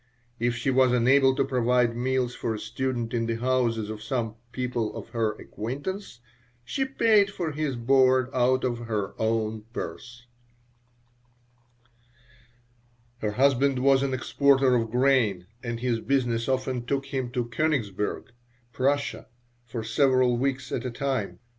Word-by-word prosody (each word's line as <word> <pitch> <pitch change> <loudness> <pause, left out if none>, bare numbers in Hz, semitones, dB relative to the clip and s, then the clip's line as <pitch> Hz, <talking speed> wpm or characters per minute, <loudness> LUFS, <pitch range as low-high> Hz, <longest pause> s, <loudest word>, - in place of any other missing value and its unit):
If 120 +1 0
she 125 +3 0
was 130 -1 +4
unable 130 +2 +4
to - - +1
provide 125 -1 +2
meals 125 0 0
for 115 -2 -3
a - - -6
student 120 +1 -3
in 115 -1 0
the 115 - -1
houses 120 -2 0
of 110 -1 -7
some 115 -1 -2 0.2
people 125 -4 -2
of - - -8
her 110 -2 0
acquaintance 135 - -6 0.4
she 265 - -1
paid 220 -6 +3
for 175 -5 -3
his 150 -2 -2
board 130 +1 +3
out 130 +1 +2
of 120 -2 -1
her 105 -4 -3
own 110 -1 -1
purse 120 -1 -7 2.9
Her 105 -2 -2
husband 135 +2 +3
was 135 +1 +4
an 135 -1 0
exporter 135 0 +3
of 115 -2 +1
grain 120 -7 +2 0.2
and 120 -1 -4
his 120 -2 0
business 120 -2 0
often 130 -2 -1
took 140 0 -1
him 130 -2 -1
to 120 -1 -1
Koenigsberg, 115 -5 -2 0.4
Prussia, 140 +3 0 0.4
for 115 -2 -5
several 130 +1 +3
weeks 135 +2 -2
at - - -2
a 130 - -2
time. 130 -3 -2
125 Hz, 140 wpm, -26 LUFS, 115-135 Hz, 2.9 s, was